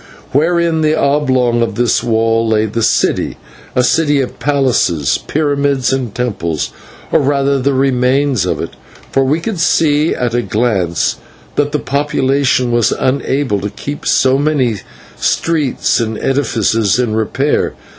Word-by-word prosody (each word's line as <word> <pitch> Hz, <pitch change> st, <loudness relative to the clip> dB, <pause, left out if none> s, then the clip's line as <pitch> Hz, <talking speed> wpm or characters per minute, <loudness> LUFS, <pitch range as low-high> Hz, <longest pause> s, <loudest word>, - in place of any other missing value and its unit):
Within 165 Hz, +2 st, +2 dB
the 155 Hz, 0 st, +2 dB
oblong 130 Hz, -5 st, +1 dB
of 115 Hz, -, -1 dB
this 120 Hz, 0 st, +1 dB
wall 115 Hz, 0 st, +1 dB
lay 110 Hz, -1 st, +2 dB
the 110 Hz, +2 st, -3 dB
city; -, -, +1 dB, 0.4 s
a 125 Hz, -, +3 dB
city 145 Hz, +2 st, +2 dB
of 130 Hz, -, -4 dB
palaces, 125 Hz, -, +1 dB
pyramids, 140 Hz, -3 st, 0 dB
and 125 Hz, -5 st, -3 dB
temples, 90 Hz, -11 st, -2 dB, 0.4 s
or -, -, +4 dB
rather 140 Hz, -1 st, +1 dB
the 135 Hz, +1 st, 0 dB
remains 130 Hz, -1 st, +1 dB
of -, -, -1 dB
it, -, -, -4 dB, 0.4 s
for 135 Hz, -, +2 dB
we 145 Hz, +5 st, +1 dB
could 185 Hz, +2 st, -4 dB
see 155 Hz, -2 st, +2 dB
at 120 Hz, -2 st, -2 dB
a 120 Hz, -, +1 dB
glance 100 Hz, -6 st, 0 dB, 0.4 s
that 145 Hz, 0 st, 0 dB
the 150 Hz, -, 0 dB
population 140 Hz, -3 st, 0 dB
was 120 Hz, -2 st, +2 dB
unable 130 Hz, -4 st, 0 dB
to 105 Hz, -, -3 dB
keep 140 Hz, +8 st, -7 dB
so 130 Hz, +1 st, +3 dB
many 140 Hz, -7 st, +1 dB, 0.4 s
streets 155 Hz, -7 st, 0 dB
and 110 Hz, -1 st, -2 dB
edifices 115 Hz, -6 st, +1 dB
in 120 Hz, -3 st, 0 dB
repair. 130 Hz, +6 st, 0 dB
130 Hz, 145 wpm, -15 LUFS, 115-145 Hz, 0.4 s, or